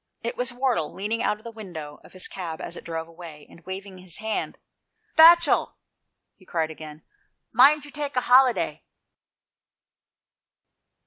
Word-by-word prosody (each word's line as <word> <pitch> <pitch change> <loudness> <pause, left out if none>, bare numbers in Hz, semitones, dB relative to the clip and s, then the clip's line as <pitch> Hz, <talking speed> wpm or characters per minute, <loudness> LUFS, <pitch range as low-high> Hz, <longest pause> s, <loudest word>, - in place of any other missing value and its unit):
It 235 - -3
was 245 0 -2
Wardle, 245 - -1
leaning 215 +4 -3
out 210 - 0
of 215 - -22
the 230 - -8
window 175 -9 -9
of - - -17
his 185 0 -3
cab 170 -4 -6
as - - -7
it - - -10
drove 165 -1 -5
away, 165 -3 -12
and 165 - -18
waving 190 0 -7
his 180 -3 -9
hand, 220 0 -3 0.6
"Batchel," 335 0 +6 0.6
he - - -22
cried 160 -3 -2
again, 155 -1 -11 0.5
"mind 285 +5 +5
you 290 - -12
take 290 -2 -5
a 250 - +2
holiday." 250 0 +3
200 Hz, 150 wpm, -25 LUFS, 165-250 Hz, 0.6 s, Batchel